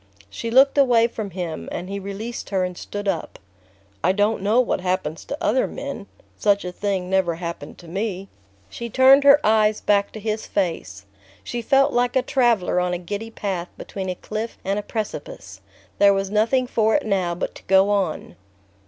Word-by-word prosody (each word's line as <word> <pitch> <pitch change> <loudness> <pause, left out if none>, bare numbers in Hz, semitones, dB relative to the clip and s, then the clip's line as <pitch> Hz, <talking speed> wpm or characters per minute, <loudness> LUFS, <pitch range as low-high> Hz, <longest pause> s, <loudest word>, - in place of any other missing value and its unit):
She 230 - -5
looked 270 +4 +5
away 240 -4 +5
from 220 -3 -4
him, 170 - -5
and 175 - -5
he 200 +1 -4
released 200 +5 -6
her 190 -2 0
and 180 0 -3
stood 205 +3 -6
up. 165 -5 -2 0.7
"I 180 - +4
don't 205 +1 +1
know 210 +5 +3
what 250 -6 +1
happens 180 -4 -2
to 285 - -5
other 310 -6 +1
men. 280 -8 -7 0.3
Such 200 -2 +2
a 180 - -4
thing 190 -1 -2
never 185 -3 +1
happened 170 -3 -7
to 175 - -14
me..." 195 +1 -3 0.4
She 235 0 -7
turned 265 +4 +6
her 280 +1 +8
eyes 215 0 +3
back 200 -1 +1
to 220 - -7
his 215 +1 -3
face. 160 - -3 0.4
She 240 - -4
felt 275 +4 +3
like 245 +1 +1
a 260 - +3
traveller 235 -10 +2
on 180 0 0
a - - -2
giddy 205 +6 -5
path 190 -5 -4
between 190 -1 -6
a 180 - -2
cliff 215 +5 -5
and 195 +2 0
a - - -3
precipice: 215 0 -6 0.4
there 200 -1 +6
was 195 0 -2
nothing 230 +5 +2
for 220 -2 +1
it 295 - +1
now 185 -4 0
but 175 - -4
to - - -14
go 195 +1 +4
on. 195 -6 -1
205 Hz, 190 wpm, -22 LUFS, 185-230 Hz, 0.7 s, her